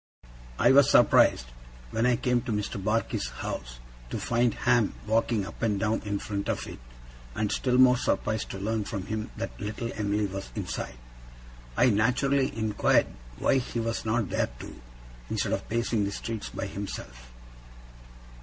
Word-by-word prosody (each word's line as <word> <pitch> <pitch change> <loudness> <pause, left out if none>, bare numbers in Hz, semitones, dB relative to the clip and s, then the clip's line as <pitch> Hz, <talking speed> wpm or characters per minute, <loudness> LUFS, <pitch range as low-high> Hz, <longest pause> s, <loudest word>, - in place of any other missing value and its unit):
I - - +5
was 140 0 +7
surprised, 110 - +5 0.5
when 115 +2 +1
I 125 - +4
came 125 0 +1
to 120 -1 -4
Mr. 105 -2 -2
Barkis's 110 - 0
house, - - -6 0.3
to - - -3
find 120 -1 +1
Ham 120 -4 +2
walking 110 -1 +1
up - - -10
and 105 -3 +1
down 110 +2 0
in 105 -1 -2
front 100 -1 -4
of - - -1
it, - - -9 0.6
and 105 -2 0
still 125 -1 +1
more 130 -1 +7
surprised 110 -2 -1
to - - -5
learn 110 +2 -1
from 100 -2 -5
him 110 0 -3
that 115 - -5
little 110 +3 -3
Em'ly 105 0 0
was 95 0 -5
inside. 65 - -4 0.8
I 125 - +5
naturally 130 +6 +2
inquired 110 -2 +2 0.2
why 135 - +3
he 120 -1 -4
was 115 0 -2
not 110 -1 0
there - - +1
too, - - -10 0.5
instead - - -1
of - - -3
pacing 115 -2 0
the 100 - -2
streets 110 +1 -5
by - - -4
himself? 60 -12 -7
110 Hz, 165 wpm, -28 LUFS, 100-120 Hz, 0.8 s, was